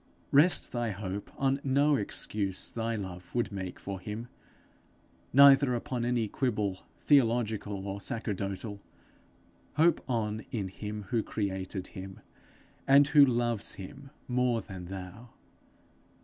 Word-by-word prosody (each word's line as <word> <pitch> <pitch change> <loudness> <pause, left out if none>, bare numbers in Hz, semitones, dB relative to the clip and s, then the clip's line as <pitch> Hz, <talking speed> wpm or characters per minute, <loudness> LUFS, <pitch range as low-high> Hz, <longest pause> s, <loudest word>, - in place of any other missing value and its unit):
Rest 150 +6 +4
thy 120 -2 -1
hope 100 0 -5
on 135 0 +1
no 140 +2 +3
excuse 100 -3 -3
thy 115 0 -2
love 90 -4 -6
would 120 -2 0
make 95 -2 -5
for 100 -1 -5
him, 110 +5 -6 1.0
neither 135 -1 +7
upon 120 0 -3
any 120 -2 +1
quibble 105 -6 -2 0.2
theological 110 -7 +2
or 100 +1 -4
sacerdotal; 100 -3 -4 0.9
hope 165 +3 +4
on 110 -3 -1
in 100 -5 -2
him 105 +2 -6
who 120 -2 +1
created 95 -3 -3
him, 95 -1 -9 0.7
and 140 +1 +6
who 145 -1 +8
loves 120 -4 +1
him 135 +9 -10 0.2
more 125 -1 +1
than 95 -4 -8
thou. 95 +5 -8
110 Hz, 120 wpm, -30 LUFS, 100-125 Hz, 1.0 s, who